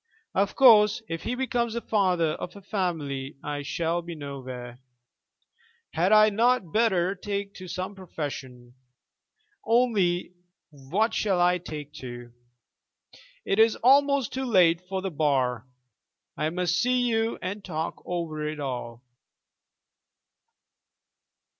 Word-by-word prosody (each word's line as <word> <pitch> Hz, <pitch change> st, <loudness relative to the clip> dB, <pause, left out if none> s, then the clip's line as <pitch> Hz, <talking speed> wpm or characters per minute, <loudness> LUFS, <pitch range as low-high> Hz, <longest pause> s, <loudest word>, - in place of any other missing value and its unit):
Of 200 Hz, +1 st, +1 dB
course, 220 Hz, -3 st, +6 dB
if 165 Hz, 0 st, -4 dB
he 245 Hz, -, -3 dB
becomes 240 Hz, -3 st, -1 dB
the 235 Hz, -, -2 dB
father 185 Hz, -8 st, +1 dB
of 175 Hz, +4 st, -6 dB
a 200 Hz, -, -11 dB
family 155 Hz, -9 st, -3 dB
I 145 Hz, 0 st, -3 dB
shall 165 Hz, +4 st, -1 dB
be 170 Hz, 0 st, -8 dB
nowhere. 130 Hz, -4 st, -8 dB, 1.1 s
Had 175 Hz, +4 st, +1 dB
I 215 Hz, 0 st, +7 dB
not 225 Hz, -5 st, +1 dB
better 195 Hz, -5 st, +2 dB
take 200 Hz, 0 st, -4 dB
to 185 Hz, -, -9 dB
some 185 Hz, +3 st, -4 dB
profession? 135 Hz, -9 st, -7 dB, 0.9 s
Only 210 Hz, -7 st, +1 dB, 0.4 s
what 165 Hz, -, -1 dB
shall 195 Hz, -4 st, +1 dB
I 180 Hz, 0 st, +3 dB
take 150 Hz, -4 st, -8 dB
to? 120 Hz, -2 st, -9 dB, 1.1 s
It 195 Hz, -, 0 dB
is 225 Hz, 0 st, +5 dB
almost 280 Hz, 0 st, +4 dB
too 265 Hz, 0 st, -2 dB
late 180 Hz, -7 st, +4 dB
for 190 Hz, -1 st, -3 dB
the 190 Hz, -, -2 dB
Bar. 130 Hz, -6 st, 0 dB, 0.7 s
I 155 Hz, -, -1 dB
must 180 Hz, +1 st, 0 dB
see 250 Hz, 0 st, +2 dB
you 225 Hz, -2 st, 0 dB
and 200 Hz, +2 st, -5 dB
talk 160 Hz, -3 st, -4 dB
over 165 Hz, -3 st, -4 dB
it 155 Hz, 0 st, -5 dB
all. 125 Hz, -3 st, -5 dB
180 Hz, 125 wpm, -26 LUFS, 150-215 Hz, 1.1 s, I